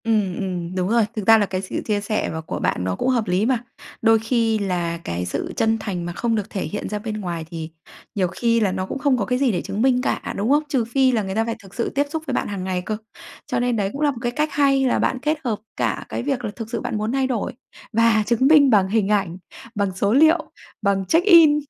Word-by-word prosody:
Ừm, 210 -5 +1
ừm, 180 -2 -4
đúng 185 0 0
rồi. 230 -1 +3
Thực 215 -3 -4
ra 225 0 +8
là 210 - +2
cái 185 -1 -3
sự 190 - -4
chia 210 -2 0
sẻ 215 +1 -1
mà 160 - -4
của 160 - -5
bạn 90 - 0
nó 90 0 -1
cũng - - -1
hợp 235 -4 +1
lý 185 +4 +1
mà, 245 -1 +1 0.4
đôi 225 0 +5
khi 225 -1 +1
là 175 -4 -1
cái 85 +1 -3
sự 90 - -4
chân 225 0 +2
thành 180 -5 -4
mà 175 - -4
không 230 +4 0
được 210 -1 -3
thể 195 - -4
hiện 210 - -4
ra 210 - -3
bên 215 0 -5
ngoài 170 -4 -4
thì 160 -2 -5 0.5
nhiều 190 -3 +1
khi 230 +5 +1
là 205 -4 +2
nó 185 0 -2
cũng 230 - -5
không 275 -2 +2
có 205 - -1
cái 250 +3 0
gì 270 -3 +3
để 180 - -1
chứng 205 - -4
minh 250 0 +3
cả, - - -2
đúng 210 +4 -1
không? 295 +2 +4
Trừ 260 -6 +1
phi 260 +2 +2
là 225 -4 0
người 190 0 -4
ta 225 +1 +1
phải 230 0 -2
thực 195 0 -15
sự 235 - -1
tiếp 285 - +3
xúc 320 +1 -4
với 270 - -2
bạn - - -1
hàng 200 -3 -4
ngày 185 -1 -2
cơ, 215 +4 -3 0.5
cho - - -1
nên 245 -1 +1
đấy 200 -3 0
cũng 280 - -5
là 295 -1 +3
một 260 - -9
cái 240 -1 -1
cách 300 +5 0
hay 275 -2 +3
là 250 - +2
bạn 255 - 0
kết 305 +2 0
hợp 225 -5 -1 0.2
cả - - -1
cái - - -3
việc 260 -3 -2
là 210 - -3
thực 225 -2 -7
sự 230 -1 -3
bạn - - -3
muốn 215 +2 -2
thay 265 0 +1
đổi 245 -3 -2 0.4
và 230 -1 +4
chứng 240 +3 +2
minh 295 -2 +6
bằng 200 -5 +4
hình 205 0 +1
ảnh, 195 -4 0 0.4
bằng 200 -2 0
số 200 +3 +1
liệu, 315 +4 +4 0.3
bằng 200 -2 +1
check-in, 330 - +6
220 Hz, 275 wpm, -22 LUFS, 195-255 Hz, 0.5 s, ra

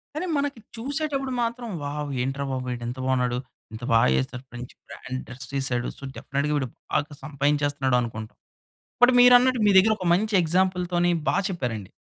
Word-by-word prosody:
కానీ, 320 +4 -2
మనకి 280 -4 -2 0.2
చూసేటప్పుడు 275 +2 -2
మాత్రం, 235 +1 -3 0.2
వావ్! 145 0 -4
ఏంట్రా 135 +2 -2
బాబు 130 -1 -3
వీడింత 120 +1 -5
బావున్నాడు. 125 -2 +1 0.3
ఇంత 110 +2 -9
బా 115 - +6 0.2
ఏసాడు. 125 - -4
మంచి 120 0 -8
బ్రాండ్ 130 0 -6
డ్రస్ 125 0 -9
ఏసాడు. 125 -2 -1
సో, - - -16
డెఫెనెట్‌గా 140 +2 -2
వీడు 135 -3 -1 0.2
బాగా 150 0 -1
సంపాదించేస్తనాడనుకుంటాం. 135 -6 -1 0.7
బట్, 245 +1 +8
మీరన్నట్టు 250 0 +6
మీ 205 - +5
దగ్గర 215 +3 +5
ఒక 185 - -4
మంచి 215 +4 0
ఎగ్జాంపుల్ 180 +2 +1
తోని 175 0 +3 0.2
బా - - +2
చెప్పారండి. 120 - -4
145 Hz, 155 wpm, -25 LUFS, -, 0.7 s, బట్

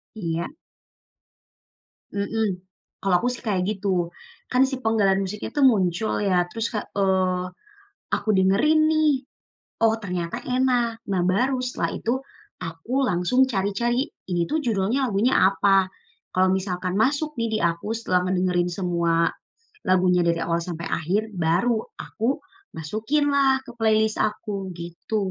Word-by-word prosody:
Iya. 170 -4 -2 1.7
Hmm, 200 -2 -1 0.4
kalau 195 -2 +2
aku 245 - 0
sih 245 - -9
kayak 195 -4 +1
gitu, 200 -1 -2 0.6
kan 250 +1 +3
si 265 - -2
penggalan 200 -3 +3
musiknya 205 +2 -5
tuh 280 - +5
muncul 205 -3 +2
ya 180 -3 +2
terus 225 +2 -2
Kak 210 - -2
eee, 185 -2 +1 0.7
aku - - -4
dengerin 205 +12 +4
nih, 310 -1 +3 0.7
oh 225 -1 +5
ternyata 180 0 -3
enak, 250 -3 +1
nah 190 -3 0
baru 255 +7 +2
setelah 250 - -2
itu, 230 - -2 0.5
aku 165 +4 -8 0.2
langsung 180 +9 +3
cari-cari, 235 +5 0 0.2
ini 175 - +1
tuh 315 - +2
judulnya 220 +2 +1
lagunya 225 +4 +2
apa? 195 -1 +3 0.5
Kalau 185 0 +4
misalkan 185 -1 -2
masuk 290 +6 +1
nih 230 - +1
di - - 0
aku 170 +2 0
setelah 205 -5 +1
ngedengerin 180 -1 +1
semua, 170 -2 +1 0.6
lagunya 180 -1 +4
dari 170 0 +1
awal 170 0 0
sampai 170 -1 -5
akhir, 180 +7 +1
baru 180 +8 +2 0.2
aku 235 +5 -2 0.4
masukin 225 - 0
lah 270 -1 +3
ke - - -9
playlist 220 -1 +2
aku 210 0 -1 0.2
gitu. 170 +5 -6
200 Hz, 135 wpm, -24 LUFS, 180-230 Hz, 1.7 s, tuh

